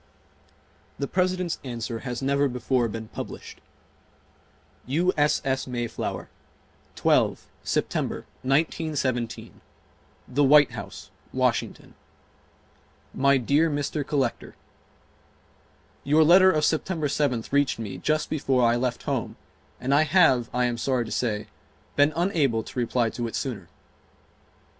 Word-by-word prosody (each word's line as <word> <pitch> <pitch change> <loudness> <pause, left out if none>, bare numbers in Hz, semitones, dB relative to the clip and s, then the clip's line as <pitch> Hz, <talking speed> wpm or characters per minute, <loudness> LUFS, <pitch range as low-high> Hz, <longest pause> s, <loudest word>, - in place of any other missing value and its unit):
The 140 - -2
President's 185 -1 0
answer 120 -3 -4
has 125 +1 -5
never 140 +1 +2
before 125 -1 0
been 110 0 -7
published: - - -8 1.3
U. 170 +8 +1
S. 150 0 +2
S. 130 0 -1
MAYFLOWER, 120 -2 -4 0.7
12 - - +2 0.2
September, - - -2 0.2
1917. 135 -4 -1 0.7
THE 140 +3 +1
WHITE 145 +1 +6
HOUSE - - -9 0.2
WASHINGTON - - -1 1.2
My 140 0 +3
dear 145 +6 +2
Mr. 145 0 -2
Collector: 135 -4 -2 1.5
Your 150 +3 +4
letter 185 +4 +7
of 155 -2 +1
September 160 0 0
7th 140 -5 -1
reached 140 0 +2
me 100 -5 -6
just 155 +8 -1
before 135 -5 +2
I 115 - +3
left 125 0 -2
home - - -2 0.4
and 130 +2 0
I 145 - +5
have, 150 -7 +4
I 125 0 +1
am 120 -1 -2
sorry 125 -1 0
to - - -8
say, 105 -4 -1 0.5
been 145 +1 +4
unable 155 - +1
to - - -6
reply 120 -1 0
to 120 -1 -3
it 115 - -6
sooner. 110 - -4
135 Hz, 120 wpm, -25 LUFS, 120-150 Hz, 1.5 s, letter